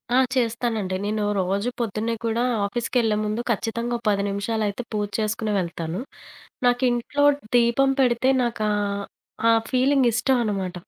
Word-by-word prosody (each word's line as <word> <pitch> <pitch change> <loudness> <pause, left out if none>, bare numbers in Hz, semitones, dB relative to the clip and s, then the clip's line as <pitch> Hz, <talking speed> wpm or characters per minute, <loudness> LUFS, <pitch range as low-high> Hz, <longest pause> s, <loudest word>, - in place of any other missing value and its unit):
ఆ! - - +5 0.2
చేస్తానండి. 230 -5 -1
నేను 210 0 -1 0.2
రోజు 195 +5 0
పొద్దున్నే 225 0 -1
కూడా 230 +1 0 0.2
ఆఫీస్‌కెళ్లే 230 +1 0
ముందు 215 +2 -1
ఖచ్చితంగా, 235 +2 -2
10 200 -1 +2
నిమిషాలైతే 210 +2 -2
పూజ 210 -1 -1
చేసుకొని 215 0 -1
వెళ్తాను. 170 +1 -4 0.7
నాకింట్లో 245 +3 +1 0.3
దీపం 240 +3 +4
పెడితే 250 0 +2
నాకా 230 -3 -1 0.8
ఆ - - +7 0.2
ఫీలింగ్ 265 0 +3
ఇష్టం 255 +2 +2
అనమాట. 195 -4 -2
225 Hz, 120 wpm, -24 LUFS, 205-240 Hz, 0.8 s, ఆ